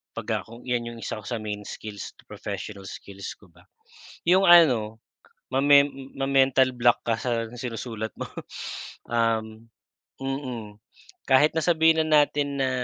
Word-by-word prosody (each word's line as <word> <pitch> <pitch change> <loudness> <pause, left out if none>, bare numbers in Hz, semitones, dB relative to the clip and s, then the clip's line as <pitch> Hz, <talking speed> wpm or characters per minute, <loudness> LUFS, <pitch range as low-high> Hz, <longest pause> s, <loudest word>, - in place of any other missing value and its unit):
'pag - - -6 0.2
ako 115 +2 -13
yan 120 -2 -1
yung 115 - -10
1 110 - -4
ko 105 - -13
sa 120 - -2
main 105 -1 -5
skills, 105 -1 -8
professional 100 0 -6
skills 100 +1 -8
ko 100 - -21
ba 85 +1 -22 0.6
yung 185 +3 +5
ano 125 - +6 0.5
mame 140 +1 +5 0.2
ma-mental 135 -1 +3
block 120 -1 +2
ka 115 -1 0
sa 115 -2 -2
sinusulat 115 -3 -5
mo - - -5 0.9
um, 115 -1 0 0.5
mm. 130 -6 -5 0.5
Kahit 145 +4 +4
na 160 - +1
sabihin 160 -1 +4
na 150 -1 +6
natin 145 -1 -2
na 130 - +2
120 Hz, 140 wpm, -25 LUFS, 110-140 Hz, 0.9 s, ano